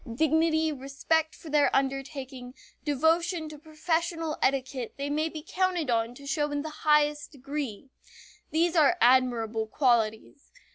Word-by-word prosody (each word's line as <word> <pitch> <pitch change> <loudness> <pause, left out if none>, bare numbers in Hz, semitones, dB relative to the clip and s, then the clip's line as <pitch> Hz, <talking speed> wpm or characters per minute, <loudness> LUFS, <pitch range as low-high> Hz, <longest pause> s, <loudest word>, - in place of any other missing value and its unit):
Dignity, 315 +4 +2
respect 295 +3 -1
for 315 - -11
their 295 -1 +4
undertaking, 270 -2 -3 0.3
devotion 320 +3 +1
to 305 -1 -11
professional 325 +1 -2
etiquette 260 -2 -1
they 280 +1 -3
may 310 +2 0
be 310 -1 -9
counted 360 -7 0
on 230 +1 0
to 280 - -12
show 295 +1 -1
in 290 0 -2
the 315 - -6 0.2
highest 295 0 +2
degree. 275 -3 -6 0.6
These 335 +2 +1
are 320 +2 +4
admirable 235 -3 +2
qualities. 235 +1 0
290 Hz, 135 wpm, -28 LUFS, 260-315 Hz, 0.6 s, their